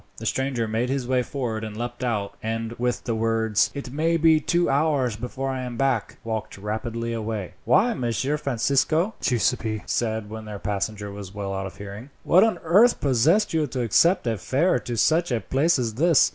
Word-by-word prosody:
The - - -8
stranger 130 -4 -1
made 115 +3 -1
his 135 -2 -2
way 130 0 +2
forward 120 -4 -3
and 110 -1 -6
leapt 120 +1 -5
out, 105 -5 -1
and 115 0 -3
with 125 0 -1
the 115 - -2
words, 110 -2 +1
"It 135 -3 -6
may 165 +3 +1
be 160 -1 +5
two 170 +3 +1
hours 140 -5 +1
before 125 +4 -4
I 130 -1 -3
am 125 -2 -5
back," 130 -4 0
walked 110 -2 -4
rapidly 115 +3 -3
away. 110 -4 -4
"Why, 230 +6 +4
Messer 130 - -1
Francisco," 140 - +1
Giuseppi 115 -3 0
said 110 -2 -1
when 110 0 -7
their 105 -1 -6
passenger 100 +1 -3
was 100 -1 -9
well 100 -1 -3
out 95 0 -3
of 95 - -12
hearing, 100 +6 -8
"what 185 +4 +5
on 225 -1 +2
earth 205 +9 +5
possessed 150 - +2
you 155 -2 +1
to 125 -1 -3
accept 170 - +3
a 115 -3 -1
fare 135 - +1
to 120 +1 -5
such 160 +7 +2
a 120 - +1
place 145 +8 +1
as 120 -3 -1
this? 160 +5 +4
120 Hz, 195 wpm, -24 LUFS, 110-140 Hz, -, be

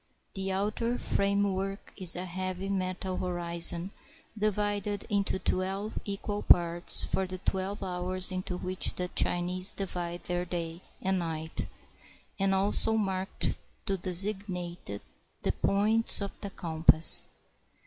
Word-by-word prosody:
The 195 -1 -3
outer 215 +5 -1
frame 200 0 +1
work 195 +1 -5
is 185 -3 +3
a 180 +1 -4
heavy 185 +1 -4
metal 185 -1 -2
horizon, 175 0 +2 0.4
divided 205 -1 -1
into 200 -2 +1
twelve 195 +3 -2
equal 205 +1 -3
parts 170 0 +4
for 190 -1 -1
the 185 0 -5
twelve 190 +2 -3
hours 185 0 -1
into 185 -1 -3
which 185 +1 -1
the 180 0 -3
Chinese 180 +2 +1
divide 175 -3 -4
their 175 0 -1
day 170 -1 -5 0.2
and 190 0 +1
night, 160 -2 -4 0.7
and 195 0 +2
also 205 +3 +2
marked 195 -3 -1 0.3
to 195 - 0
designate 180 - -1 0.4
the - - +2
points 215 +3 +4
of 200 -1 -5
the 200 - -4
compass. 160 -3 +5
185 Hz, 125 wpm, -29 LUFS, 180-200 Hz, 0.7 s, compass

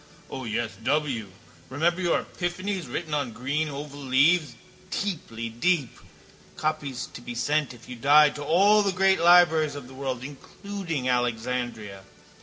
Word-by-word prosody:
O 130 -1 -5
yes, 110 0 -2
W. 140 -7 0 0.4
Remember 170 +7 0
your 175 -2 +1
epiphanies 180 -3 -4
written 160 +2 -4
on 145 -6 -1
green 145 +6 -2
oval 145 0 -7
leaves, 140 +1 +3 0.3
deeply 150 - -3
deep, 140 +4 0 0.6
copies 150 -4 -2
to - - -9
be 120 0 -7
sent 145 +4 0
if 120 -2 -14
you 125 - -7
died 145 +5 +5
to 145 - -6
all 195 +8 +5
the 200 -1 +1
great 190 0 +3
libraries 165 -3 +5
of 140 -3 -8
the 130 - -13
world, 130 -2 -4
including 165 +1 -5
Alexandria? 120 -4 -2
145 Hz, 145 wpm, -26 LUFS, 125-170 Hz, 0.6 s, died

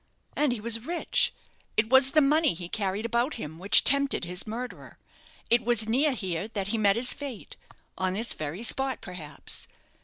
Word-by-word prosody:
"And 295 -3 +1
he 240 - -3
was 230 +1 0
rich. 345 0 +1 0.5
It 215 +2 0
was 265 0 +6
the 305 +2 +3
money 300 - +2
he 175 0 -7
carried 200 +1 -3
about 235 +5 -1
him 160 -7 -8
which 195 +3 +7
tempted 280 -7 +3
his 180 +4 -4
murderer. 240 +3 -8 0.5
It 240 0 +3
was 230 -2 +3
near 270 +6 +1
here 190 -5 -4
that 200 -3 -5
he 225 - -1
met 200 -2 +3
his 245 +2 +5
fate 275 -7 -9 0.4
on 185 -1 -1
this 225 +5 -1
very 155 +8 -6
spot, 265 +2 0
perhaps. 155 -6 -6
225 Hz, 180 wpm, -26 LUFS, 190-260 Hz, 0.5 s, which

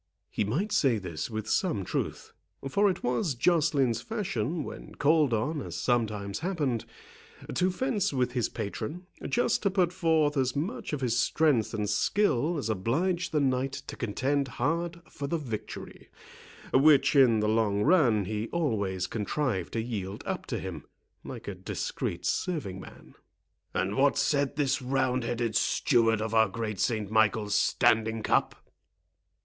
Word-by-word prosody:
He - - 0
might 155 - -1
say 130 -6 +3
this 90 -4 -5
with 110 -1 -4
some 110 - 0
truth; - - -4 0.3
for 200 +9 +3
it 185 - -3
was 130 - 0
Joceline's 145 -4 +2
fashion, 170 - -2
when - - -9
called 150 -2 +3
on, 135 +8 -1
as 90 -2 -6
sometimes 105 -5 -1
happened, 150 - -1 0.7
to 185 +1 +2
fence 210 -1 0
with 125 -3 0
his 120 -4 0
patron, 130 - -5 0.2
just 240 -2 +1
to 200 - +2
put 185 -2 +1
forth 160 -5 +2
as 130 0 +1
much 210 - -3
of 150 -2 -3
his 120 -2 +1
strength 130 -3 +2
and 105 -2 -2
skill 155 - +1
as 140 - -3
obliged 160 - 0
the 155 - +2
Knight 135 -1 0
to - - -7
contend 135 +5 -1
hard 170 +7 -2
for 140 - -6
the 170 - 0
victory, 120 -9 -7 0.6
which, 145 +1 +5
in 125 -5 +6
the 105 - +1
long 105 -2 +2
run, 130 - +4
he 110 +3 -3
always 100 - -1
contrived 105 - -2
to 115 - 0
yield 100 -4 -5
up - - -4
to - - -2
him, 90 -6 -6 0.4
like - - -8
a - - -3
discreet - - -4
serving 140 - -2
man. - - -13 0.6
"And 95 +3 -1
what 140 +3 +3
said 140 -1 +1
this 145 -1 +1
roundheaded 125 -3 0
steward 115 -2 +2
of 110 0 -4
our 110 -2 +4
great 105 -1 -4
Saint 110 -4 0
Michael's 110 -1 +2
standing 110 +1 +2
cup?" - - +1
125 Hz, 155 wpm, -28 LUFS, 110-155 Hz, 0.7 s, in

